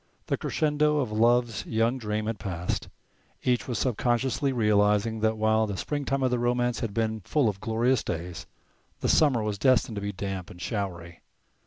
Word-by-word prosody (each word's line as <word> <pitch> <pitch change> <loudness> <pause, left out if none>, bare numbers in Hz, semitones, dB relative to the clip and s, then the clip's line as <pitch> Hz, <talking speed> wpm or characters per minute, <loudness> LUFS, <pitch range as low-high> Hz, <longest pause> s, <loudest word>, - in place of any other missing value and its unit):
The - - 0
crescendo 150 0 +1
of 130 -7 -1
love's 115 0 +2
young 115 +3 +1
dream 105 -1 -2
had 110 0 -3
passed. 90 -2 -3 0.5
Each 125 -1 +1
was 120 -3 -2
sub 125 -3 0
consciously 130 +3 +1
realizing 105 -1 +2
that 110 0 +1
while 110 0 +2
the 100 -2 -4
springtime 140 0 -2
of 130 - +2
their 125 - +1
romance 120 0 +1
had 115 - -3
been 110 0 -1
full 140 - +1
of 100 -2 -2
glorious 115 +3 +1
days 85 0 -5 0.5
the - - 0
summer 135 -8 +4
was 105 -2 -2
destined 125 -3 +3
to - - -3
be 100 0 -2
damp 95 -2 -5
and 90 - -12
showery. 90 -5 -4
110 Hz, 180 wpm, -27 LUFS, 105-125 Hz, 0.5 s, summer